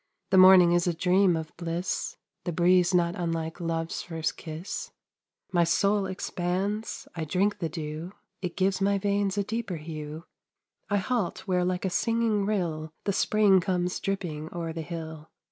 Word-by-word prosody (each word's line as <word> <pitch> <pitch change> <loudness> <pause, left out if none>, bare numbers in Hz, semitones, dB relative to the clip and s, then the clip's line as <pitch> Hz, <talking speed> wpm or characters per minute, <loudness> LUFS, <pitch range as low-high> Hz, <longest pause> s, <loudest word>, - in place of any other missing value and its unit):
The 190 - +5
morning 185 -2 +8
is 175 0 +2
a 175 - +1
dream 180 +1 +3
of 160 -1 -6
bliss, 170 +1 -3 0.3
The 175 - -1
breeze 175 +1 +4
not 175 -2 +2
unlike 165 -1 -3
Love's 165 -1 -2
first 160 -3 -3
kiss. 160 +3 -6 0.6
My 175 -2 +4
soul 200 +4 +2
expands 190 +3 -3
I 165 - -3
drink 190 +6 0
the 165 - -2
dew, 155 +2 -5 0.3
It 180 -2 -4
gives 190 0 +1
my 200 +1 +3
veins 200 0 0
a 200 - +2
deeper 220 -2 -3
hue, 155 0 -7 0.7
I 205 - +2
halt 200 -3 -1
where 180 -1 +2
like 180 +1 -1
a 190 - 0
singing 225 -1 +1
rill 165 -7 -1
The 200 - 0
spring 205 -1 +4
comes 180 0 -1
dripping 165 -6 -3
o'er 165 -2 -4
the 165 - -4
hill. 160 -1 -7
180 Hz, 160 wpm, -27 LUFS, 165-195 Hz, 0.7 s, morning